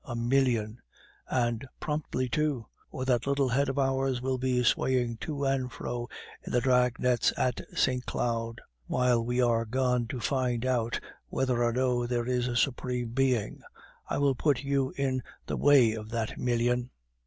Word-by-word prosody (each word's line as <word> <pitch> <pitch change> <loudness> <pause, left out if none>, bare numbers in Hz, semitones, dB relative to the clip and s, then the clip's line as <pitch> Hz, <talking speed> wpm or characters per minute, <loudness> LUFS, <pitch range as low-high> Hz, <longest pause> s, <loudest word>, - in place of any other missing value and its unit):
A 125 -6 -6
million; 120 -2 +1 0.5
and 120 -2 0 0.2
promptly, 150 -4 -2
too, 135 -1 0 0.2
or 130 - -4
that 125 -1 +1
little 140 -1 +2
head 135 +3 +1
of 135 - -3
ours 135 -1 +1
will 130 0 -1
be 125 -1 +1
swaying 120 -1 +1
to 145 +3 -3
and 135 -2 0
fro 120 +1 -5 0.3
in - - -7
the 125 - +3
drag 125 -1 +3
nets 125 -2 +2
at 125 -1 0 0.2
Saint 125 -1 +1
Cloud, 115 -1 -2 0.3
while 125 -2 +2
we 120 +2 +1
are 115 -1 +2
gone 125 0 0
to 125 - -5
find 125 -1 0
out 120 -3 0 0.3
whether 125 -2 0
or 120 - +2
no 125 -1 +1
there 120 -1 -1
is 125 0 0
a 120 - -2
Supreme 125 -1 0
Being. 125 -3 0 0.5
I - - 0
will 140 -1 +3
put 140 +1 +1
you 140 -1 0
in 130 -2 0 0.2
the - - -3
way 135 -6 +5
of 110 -1 -7
that 115 -2 -2
million." 120 0 0
125 Hz, 170 wpm, -29 LUFS, 120-130 Hz, 0.5 s, way